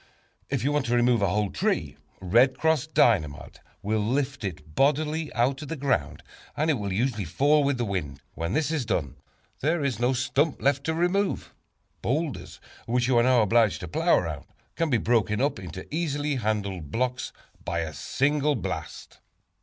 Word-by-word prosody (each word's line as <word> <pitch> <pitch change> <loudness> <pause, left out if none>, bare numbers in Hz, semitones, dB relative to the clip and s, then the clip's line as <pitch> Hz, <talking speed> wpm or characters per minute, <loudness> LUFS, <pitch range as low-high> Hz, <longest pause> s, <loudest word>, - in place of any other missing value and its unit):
If 135 -4 -1
you 140 - +1
want 145 -3 0
to 120 - +1
remove 120 -2 +3
a 100 - +3
whole 105 +1 0
tree, - - -1 0.2
"Red 120 +8 +3
Cross" 160 -3 +1
Dynamite 85 - +1 0.2
will 110 +2 0
lift 125 +4 -1
it 80 -5 -6
bodily 150 - +1
out 130 +4 +1
of 150 - -7
the 165 - -4
ground, 135 - -1 0.3
and 155 +2 +2
it 140 - -1
will 100 -1 -3
usually 110 +1 0
fall 140 - +3
with 140 -1 +1
the 120 - -1
wind. 75 -9 -3
When 85 +3 -3
this 155 +2 +1
is 155 -5 0
done, 85 - -2 0.4
there 155 +2 0
is 130 -6 -1
no 125 +2 +2
stump 135 +4 0
left 140 0 +1
to 160 - 0
remove. 180 +4 0 0.5
Boulders, 145 +3 -2 0.3
which 120 +1 +1
you 130 - +2
are - - +5
now 125 -1 +4
obliged 115 0 +3
to 90 - -5
plow 80 - +3
around, - - -3 0.3
can 165 -1 0
be 125 - +3
broken 110 -2 +1
up 140 +1 0
into 90 0 -8
easily 150 -3 -1
handled 100 - -2
blocks 125 - -2 0.3
by 85 -1 -2
a 80 -1 -4
single 145 - +1
blast. 110 - -6
125 Hz, 180 wpm, -26 LUFS, 100-145 Hz, 0.5 s, are